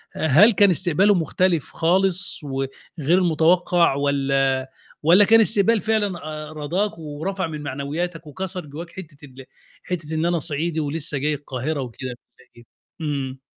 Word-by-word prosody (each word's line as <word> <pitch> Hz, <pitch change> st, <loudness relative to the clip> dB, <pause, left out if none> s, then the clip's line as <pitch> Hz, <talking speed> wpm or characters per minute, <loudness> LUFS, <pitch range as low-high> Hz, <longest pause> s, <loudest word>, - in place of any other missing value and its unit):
أ -, -, -2 dB
هل 185 Hz, -, +7 dB
كان 205 Hz, -1 st, +5 dB
استقباله 185 Hz, +3 st, +2 dB
مختلف 175 Hz, -2 st, 0 dB
خالص 185 Hz, +2 st, +2 dB
وغير 140 Hz, +5 st, -2 dB
متوقّع، 170 Hz, -1 st, +3 dB
والّا 135 Hz, -2 st, 0 dB, 0.3 s
والّا 180 Hz, +6 st, +6 dB
كان 225 Hz, +2 st, +6 dB
استقبال 215 Hz, 0 st, +2 dB
فعلًا 205 Hz, -4 st, 0 dB, 0.3 s
أ -, -, -11 dB
راضاك 170 Hz, +7 st, -2 dB
ورفع 165 Hz, +5 st, -4 dB
من 155 Hz, -2 st, -6 dB
معنوياتك 155 Hz, +4 st, -4 dB
وكسر 185 Hz, +2 st, -5 dB
جوّاك 155 Hz, +4 st, -8 dB
حِتّة 170 Hz, -5 st, -11 dB
ال 135 Hz, -1 st, -13 dB, 0.4 s
حِتّة 160 Hz, -3 st, -5 dB
إن 160 Hz, +1 st, 0 dB
أنا 175 Hz, -1 st, +1 dB
صعيدي 160 Hz, +1 st, -2 dB
ولسّه 150 Hz, 0 st, -2 dB
جاي 150 Hz, +3 st, 0 dB
القاهرة 140 Hz, +1 st, -4 dB
وكده 130 Hz, +1 st, -6 dB
والّا 125 Hz, +1 st, -14 dB
إيه؟ 120 Hz, -, -15 dB, 0.4 s
امم. 135 Hz, -3 st, -3 dB
160 Hz, 145 wpm, -22 LUFS, 140-180 Hz, 0.4 s, هل